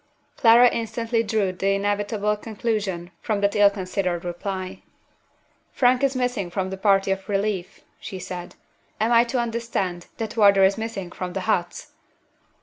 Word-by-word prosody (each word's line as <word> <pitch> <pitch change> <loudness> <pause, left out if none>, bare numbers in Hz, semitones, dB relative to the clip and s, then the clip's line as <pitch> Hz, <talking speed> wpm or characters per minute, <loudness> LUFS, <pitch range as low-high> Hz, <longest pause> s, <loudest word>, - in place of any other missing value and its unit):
Clara 235 0 +7
instantly 230 0 -1
drew 215 -4 0
the 195 +2 0
inevitable 205 +1 0
conclusion 210 -5 -3
from 215 -3 -1
that 200 0 +1
ill 205 -1 +6
considered 185 -3 -3
reply. 185 +1 -5 0.9
"Frank 250 +1 +3
is 275 -1 +2
missing 245 -7 -1
from 190 +1 -3
the - - -3
party 195 -1 +3
of 195 +2 -3
relief," 200 -2 -2 0.2
she 190 - -7
said. 180 -1 -7 0.4
"Am 220 +2 +1
I 235 0 +6
to 245 +2 -2
understand 230 -7 -2
that 225 0 -4
Wardour 200 -3 +5
is 190 +1 +4
missing 220 -5 -5
from 180 -1 -5
the 190 - -3
huts?" 180 -4 -2
200 Hz, 150 wpm, -24 LUFS, 190-225 Hz, 0.9 s, Clara